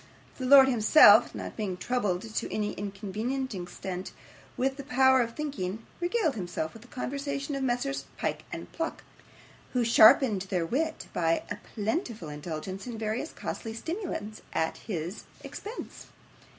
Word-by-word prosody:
The 255 - -2
lord 270 0 +9
himself, 225 -2 +7
not - - -6
being 195 -5 -3
troubled 205 -5 -1
to 220 -1 -4
any 210 -1 -1
inconvenient 210 +6 -3
extent 180 0 -6 0.4
with 265 +1 0
the 280 - -6
power 265 -1 +4
of 230 -1 -3
thinking, 225 -9 -4
regaled 350 - +1
himself 175 -6 -4
with 225 - -12
the 240 - -15
conversation 280 +3 -4
of 275 - -2
Messrs 265 +2 -1
Pyke - - -2
and - - -7
Pluck, 330 0 -4 0.7
who 250 -1 +2
sharpened 225 -3 +6
their 180 -4 0
wit 315 - -1
by 165 -1 +1
a - - -3 0.2
plentiful 220 - -2
indulgence 160 +7 -6
in 235 -2 -5
various 220 +7 -2
costly 225 -1 -5
stimulants 320 - -5
at 160 - 0
his 180 -1 -5 0.2
expense. 435 +4 -8
225 Hz, 145 wpm, -29 LUFS, 195-270 Hz, 0.7 s, lord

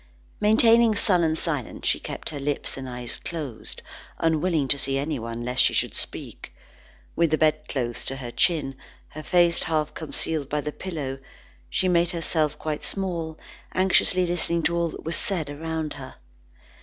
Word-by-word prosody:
Maintaining 225 +1 +5
sullen 175 -7 +2
silence, 150 -7 -3
she - - +2
kept - - -4
her 145 - -5
lips 145 +1 -1
and 130 -1 -6
eyes 125 -1 -4
closed, 145 -9 -6 0.3
unwilling 160 -2 +1
to 140 - +3
see 135 0 +1
anyone 120 -5 -3
lest 125 +1 +2
she - - +4
should - - +1
speak. - - -4 0.6
With 170 -1 +3
the 155 - +2
bedclothes 150 -6 0
to 135 - -2
her 125 -3 -6
chin, 150 -2 +1 0.3
her 155 - -8
face 175 +1 +3
half 155 -2 0
concealed 155 -2 -2
by 150 0 0
the 150 - -3
pillow, 145 -7 -5 0.5
she 185 - +1
made 175 -1 +3
herself 155 -3 0
quite 155 -1 -3
small, 170 -5 -2 0.4
anxiously 185 -1 +4
listening 170 -1 0
to 165 +3 +2
all 170 0 +1
that - - -9
was 165 - 0
said 165 -8 +1
around 160 +1 -3
her. 135 -2 -9
155 Hz, 160 wpm, -25 LUFS, 140-170 Hz, 0.6 s, Maintaining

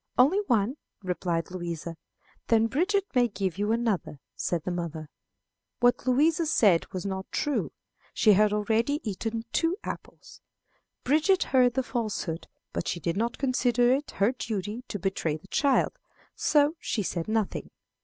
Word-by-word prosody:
"Only 290 +11 +5
one," 235 +2 +1 0.3
replied 175 -2 -2
Louisa. 170 -2 -5 0.5
"Then 225 -1 +4
Bridget 370 - +1
may 245 -2 +4
give 195 -4 -3
you 205 +1 +1
another," 225 -10 -1 0.2
said 170 -3 -2
the 180 - -2
mother. 165 -3 -5 0.7
What 245 +1 +2
Louisa 310 +6 +3
said 200 - +3
was 185 +1 -5
not 190 -1 -4
true. 295 -2 -1 0.4
She 215 -3 +5
had 210 +1 +4
already 225 +7 +1
eaten 225 +3 -3
two 335 +3 +1
apples. - - -8 0.6
Bridget 315 +8 +3
heard 250 -2 +3
the 265 - +1
falsehood, 215 -9 -3 0.3
but - - -3
she 175 - -2
did 170 0 -2
not 230 +3 -1
consider 250 -2 +2
it 285 +3 -2
her 200 +4 +2
duty 220 -2 -4
to - - -4
betray 185 -5 -1
the 155 - -19
child, 280 -3 +2 0.4
so 295 0 +3
she 210 - -2
said 170 -2 -3
nothing. 220 -2 -1
225 Hz, 150 wpm, -27 LUFS, 185-255 Hz, 0.7 s, Only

